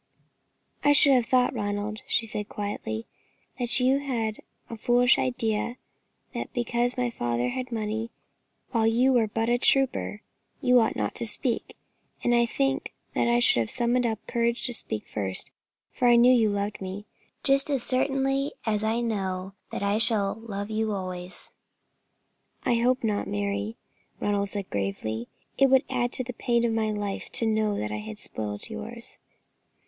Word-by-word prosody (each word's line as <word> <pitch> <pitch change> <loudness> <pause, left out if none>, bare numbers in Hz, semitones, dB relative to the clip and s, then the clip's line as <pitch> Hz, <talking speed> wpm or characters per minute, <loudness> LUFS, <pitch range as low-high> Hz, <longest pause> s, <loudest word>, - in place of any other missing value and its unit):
"I 290 - +5
should 285 -1 +7
have 245 -3 +2
thought, 250 0 +3
Ronald," 205 -1 -3
she 230 - +1
said, 210 -1 -4
quietly, 160 - -4 0.5
"that 240 0 +1
you 260 +2 +3
had 230 -6 -3 0.3
a 230 - -7
foolish 245 +3 +3
idea 235 -1 -1 0.6
that - - -5
because 240 +1 0
my 245 -1 0
father 120 - -1
had 255 - -4
money, 220 0 -3 0.6
while 225 -3 +2
you 245 +4 +3
were 230 -3 +3
but 225 +2 -2
a 240 +1 +2
trooper, 265 -6 +1 0.4
you 250 0 +5
ought 225 - +1
not - - -2
to - - -2
speak; 235 +2 -3 0.5
and 240 - +2
I 235 0 +3
think 270 +3 -1 0.2
that - - +1
I 235 0 +3
should 240 - +3
have 115 -2 -1
summoned 240 +1 +1
up 220 -1 -1
courage 235 0 0
to 245 - -1
speak 110 - -5
first, 95 -3 -3 0.4
for 245 - +1
I 240 - +7
knew 245 +2 +6
you 225 -3 +4
loved 205 0 -3
me, 190 +2 -6 0.4
just 275 +1 +7
as 275 -4 +6
certainly 270 +1 +2
as 215 -1 0
I 225 +2 0
know 190 -4 -3 0.2
that - - -4
I 200 +2 +1
shall 215 -3 +5
love 205 -2 -5
you 220 0 -1
always." 185 -2 +2 1.1
"I - - +3
hope 250 +2 +1
not, 210 -2 -1
Mary," 100 +1 -3 0.4
Ronald 200 -1 0
said, 200 -1 -6
gravely; 105 +4 -3 0.3
"it 275 -1 +5
would 265 +1 +5
add 245 -1 0
to 255 - -1
the 250 0 -6
pain 235 0 +1
of 230 - 0
my 220 -1 0
life 205 -2 -4
to 230 - +2
know 215 -2 +1
that 105 0 -3
I 105 - -3
had 105 0 -8
spoilt 105 -1 -6
yours." - - -8
225 Hz, 170 wpm, -26 LUFS, 200-245 Hz, 1.1 s, should